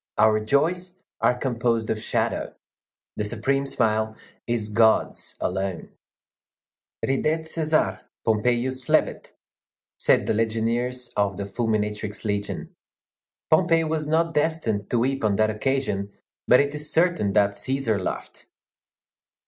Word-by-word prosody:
Our 110 -1 +5
joys 175 +9 0 0.2
are 125 - +3
composed 120 -3 0
of 110 - -2
shadow. - - -1 0.6
The - - 0
supreme 135 +6 0
smile 110 -3 0 0.3
is 115 -3 -1
God's 110 +1 +2
alone. 95 -1 -3 1.1
Ridet 155 +4 +1
Cæsar, 155 - 0 0.2
Pompeius 120 +4 +1
flebit, - - 0 0.7
said - - +3
the - - +1
legionaries 115 +3 -1
of 100 -2 0
the 100 - -3
Fulminatrix 105 0 -2
Legion. 100 -1 -3 0.8
Pompey 165 0 +4
was 155 -1 -2
not 165 +2 +1
destined 150 -10 0
to 120 - +1
weep 135 +3 0
on 105 -2 +2
that 110 +1 +2
occasion, 105 -4 -1 0.4
but 125 - +7
it 140 0 +1
is 150 0 -5
certain 165 - +2
that 100 0 +4
Cæsar 110 0 -1
laughed. - - -5
115 Hz, 120 wpm, -24 LUFS, 105-140 Hz, 1.1 s, but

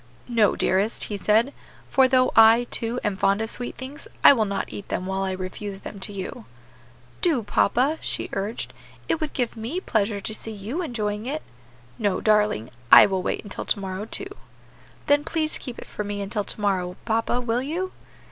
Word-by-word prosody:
"No, 230 -4 +3
dearest," 195 +4 +1
he 210 - -3
said; 225 +7 +2 0.4
"for 265 -1 +5
though 255 0 +3
I, 225 +2 +7
too, 235 +2 0
am 210 -2 0
fond 195 +1 +2
of 220 0 -2
sweet 245 - -5
things, 265 +3 -8 0.2
I - - +10
will 225 -5 +1
not 200 -1 -3
eat 200 - -7
them 185 - -2
while 190 0 -2
I 190 -1 -1
refuse 190 +2 -5
them 200 - -8
to 190 - -3
you." 190 - -6 0.8
"Do, 305 -10 +2
papa," 255 +9 +2
she - - -1
urged, 200 +4 -3 0.3
"it 320 - 0
would 310 - -2
give 245 -3 -1
me 235 +11 -3
pleasure 215 - 0
to 215 - -5
see 220 +1 -5
you 215 - -4
enjoying 215 -7 -3
it." 305 +3 -3 0.6
"No, 205 -4 +1
darling, 210 - +2 0.2
I - - +11
will 190 -2 0
wait - - -2
until 205 - -6
to - - +1
morrow, 190 +1 -4
too." 390 - -4 0.7
"Then 290 0 +4
please 310 -1 -1
keep 250 -3 -7
it - - -8
for 210 - -5
me 205 0 -4
until 200 +1 -2
to - - -5
morrow, 185 -3 0
papa, 225 +2 +1
will 240 0 0
you?" 345 +7 -3
220 Hz, 195 wpm, -24 LUFS, 200-255 Hz, 0.8 s, I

